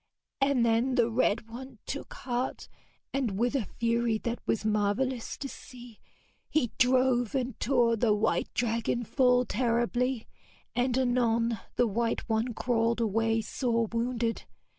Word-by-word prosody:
And 270 -3 +3
then 235 +3 +2
the 235 -2 +3
red 225 -1 +1
one 250 +2 -9
took 285 - -5
heart, 250 0 -3 0.5
and 245 -8 -1
with 240 +4 +1
a 255 -6 0
fury 235 -1 +1
that 235 0 -2
was 215 - 0
marvellous 215 +4 0
to 280 - -5
see, 245 -4 -12 0.5
he 250 -7 +1
drove 255 -1 +3
and 255 -3 -2
tore 240 -2 +3
the 225 0 +2
white 210 +1 +1
dragon 230 0 0
full 250 +1 +3
terribly, 240 +1 0 0.5
and 245 +1 +1
anon 235 -3 +1 0.2
the 245 - +3
white 230 +2 -1
one 225 +1 0
crawled 230 -1 +1
away 225 0 +1
sore 230 0 0
wounded. 230 0 -1
235 Hz, 140 wpm, -29 LUFS, 225-250 Hz, 0.5 s, And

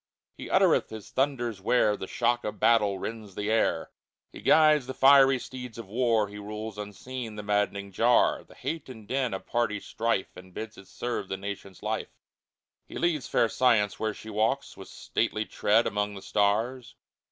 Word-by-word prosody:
He - - -8
uttereth - - +3
His 110 -2 -9
thunders 120 -7 -1
where 105 0 +3
The 95 - -7
shock 120 +2 0
of 105 - -5
battle 105 -4 +3
rends 110 -3 -7
the 105 +1 -2
air; 110 - +1 0.4
He - - -10
guides 155 -4 +5
the 130 - -5
fiery 135 0 +6
steeds 125 -2 -8
of 115 - -7
War; 115 -1 +1
He 105 +1 -9
rules 105 +1 -6
unseen 110 +3 -6
the 105 - -6
maddening 105 -1 -1
jar, 120 +5 +3
The - - -18
hate 160 -4 -5
and 110 -5 -11
din 130 0 0
of 95 - -5
party 115 -3 0
strife. 110 -1 -2
And 90 0 -13
bids 110 0 -6
it 95 - -14
serve 120 -5 -4
the 95 - -2
nation's 100 -1 -7
life; - - -3 0.7
He - - -8
leads 155 -8 0
fair 115 - +3
Science, 110 -4 +2
where 110 -1 -1
she 110 - -9
walks 110 +6 0
With - - -11
stately 110 0 -2
tread 110 +3 +2
among 105 0 -1
the 95 - -9
stars. 110 +5 0
110 Hz, 180 wpm, -28 LUFS, 105-125 Hz, 0.7 s, fiery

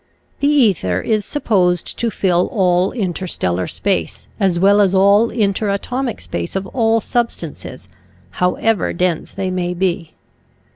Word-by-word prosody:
The 280 - +1
ether 200 - +2
is 215 - -1
supposed 185 - 0
to 235 - 0
fill 180 -4 +1
all 185 -4 +2
interstellar 175 - -2
space 200 -1 -2
as 190 -4 +1
well 200 +3 +4
as 195 -1 +2
all 200 +4 +4
interatomic 220 +4 -1
space 85 -1 -5
of 195 0 -2
all 225 0 +1
substances, 240 +1 -4 0.5
however 195 +3 +1
dense 175 -2 -2
they 190 -1 -2
may 180 -1 -2
be. 175 -3 -2
195 Hz, 130 wpm, -18 LUFS, 180-225 Hz, 0.5 s, well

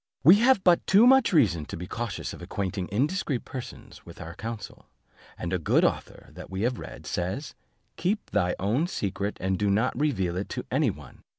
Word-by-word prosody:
We 170 +8 +9
have 235 -3 +4
but 175 -2 +4
too 205 +5 +6
much 265 0 +6
reason 100 - +3
to - - -7
be 90 - -6
cautious 115 0 -4
of - - -10
acquainting 95 -2 -3
indiscreet 140 - -1
persons 130 -3 -9
with - - -13
our 85 0 -7
counsel; 115 +3 -7 0.5
and 85 +1 -4
a 90 - +1
good 80 - +3
author - - -3
that - - -11
we 95 +2 -3
have 125 +1 0
read, - - -9
says, 95 - -3 0.4
'Keep 205 +4 -2
thy 90 -3 +1
own 115 - +1
secret, 100 - -3
and 95 0 -1
do 105 -1 +1
not 110 +6 +2
reveal 95 - 0
it 95 - -4
to - - -5
any - - +2
one. - - -10
110 Hz, 195 wpm, -27 LUFS, 95-150 Hz, 0.5 s, We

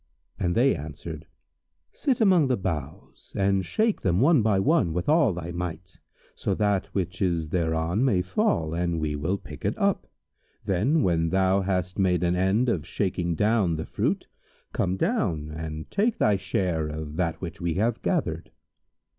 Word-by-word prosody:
and 85 -1 0
they 130 +4 +4
answered, 75 +1 -8 0.7
"Sit 265 -4 0
among 185 - +5
the 125 -2 +1
boughs 80 -2 -6
and 95 -1 +2
shake 215 - 0
them 90 -3 +1
one 145 +1 +5
by 105 -2 +2
one 105 - +2
with 90 +1 -2
all 150 -5 +4
thy 85 -1 -5
might, 90 +1 -5 0.4
so 100 - -2
that 100 -2 +1
which 90 -2 -3
is 85 -4 0
thereon 80 +4 0
may 100 -9 +2
fall, 85 -3 0
and 85 -1 -1
we 75 -1 -1
will 80 +7 -1
pick - - -11
it - - -1
up. - - 0 0.6
Then, 125 - +2
when 85 -2 +2
thou 95 +2 +2
hast 90 0 -2
made 90 -2 +2
an 90 0 +2
end 95 +7 +2
of 95 -10 0
shaking 90 -3 -1
down 105 -2 +2
the 80 - -4
fruit, - - -1 0.5
come 90 +1 0
down 75 -5 -1
and 80 0 -6
take 215 +3 +1
thy 105 -2 +3
share 90 -4 -1
of 75 0 -6
that 85 -3 -1
which 90 +1 -7
we 85 -2 -1
have 110 +4 0
gathered." - - -1
90 Hz, 170 wpm, -26 LUFS, 80-100 Hz, 0.7 s, among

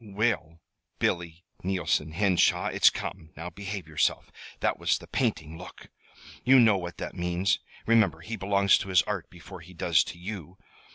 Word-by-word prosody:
"We'll, 100 -6 -1 0.4
Billy 85 0 -2 0.2
Neilson 90 -4 0
Henshaw, 95 0 +2
it's - - +5
come! 80 - -6
Now 85 +3 -6
behave 100 0 -6
yourself. 75 -1 0 0.3
That - - 0
was - - +2
the - - -12
painting 80 0 -2
look! 90 - -12 0.5
You 130 +1 +6
know 110 -5 +5
what 85 -1 -7
that - - -5
means. 90 +2 0 0.3
Remember, 115 -2 +3
he 115 - -5
belongs 100 -1 +3
to 95 - -6
his 90 -3 +4
Art 100 -5 -4
before 90 +2 -12
he 90 +3 -14
does - - +3
to - - -8
you. 90 -1 -7
90 Hz, 165 wpm, -27 LUFS, 85-100 Hz, 0.5 s, You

